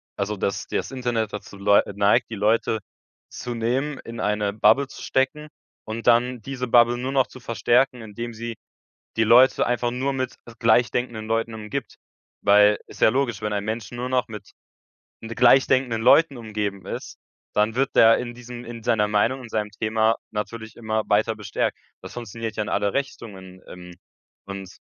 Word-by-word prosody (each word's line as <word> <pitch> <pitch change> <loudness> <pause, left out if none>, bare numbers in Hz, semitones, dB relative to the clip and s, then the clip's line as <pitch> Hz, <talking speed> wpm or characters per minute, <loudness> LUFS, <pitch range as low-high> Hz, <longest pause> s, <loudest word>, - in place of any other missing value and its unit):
also 100 +1 -3
dass 100 - -2
das - - -3
Internet 120 -5 -2
dazu 100 -1 -8
leu 100 +1 +4
neigt, 100 +2 +3
die 110 - -5
Leute 110 +2 +1 0.5
zu 120 -1 -6
nehmen, 130 +6 -1
in 115 +1 -9
eine 105 -1 0
Bubble 120 +6 +4
zu - - -12
stecken 135 +3 -1 0.4
und 110 +1 -6
dann 120 +1 +3
diese 125 +1 -5
Bubble 120 0 +5
nur 130 +2 -3
noch 135 -2 +3
zu 130 - -13
verstärken, 120 +1 +1
indem 115 +2 -7
sie 115 +1 -6 0.6
die 110 - +3
Leute 120 +4 +5
einfach 120 0 0
nur 130 +3 -1
mit 130 -1 -3 0.2
gleichdenkenden 120 -1 +1
Leuten 115 0 -1
umgibt. 110 +3 -6 0.5
Weil 105 +1 +5
ist - - -14
ja - - +6
logisch, 120 -3 -1
wenn 105 - -2
ein 100 -1 -2
Menschen 110 +2 -4
nur 125 +1 -3
noch 125 -3 0
mit 105 -3 -10 0.7
n 115 - -8
gleichdenkenden 125 0 +3
Leuten 145 +1 +5
umgeben 105 -4 -4
ist, - - -7 0.4
dann 105 +2 +1
wird 135 +1 0
der 115 0 +7
in 120 -1 -5
diesem 120 0 -9
in 115 -1 -8
seiner 110 -3 +2
Meinung, 115 +5 +1
in 120 - -10
seinem 105 -1 -2
Thema 110 +1 +1
natürlich 110 +1 -6
immer 110 -1 -1
weiter 110 +2 +2
bestärkt. 105 -2 -2 0.2
Das - - -10
funktioniert 115 -1 -6
ja 105 - -1
in 105 - -6
alle 100 0 0
Richtungen, 95 -9 -6
ähm, 90 -1 -11 0.5
und 100 -1 -8
115 Hz, 175 wpm, -23 LUFS, 105-125 Hz, 0.7 s, der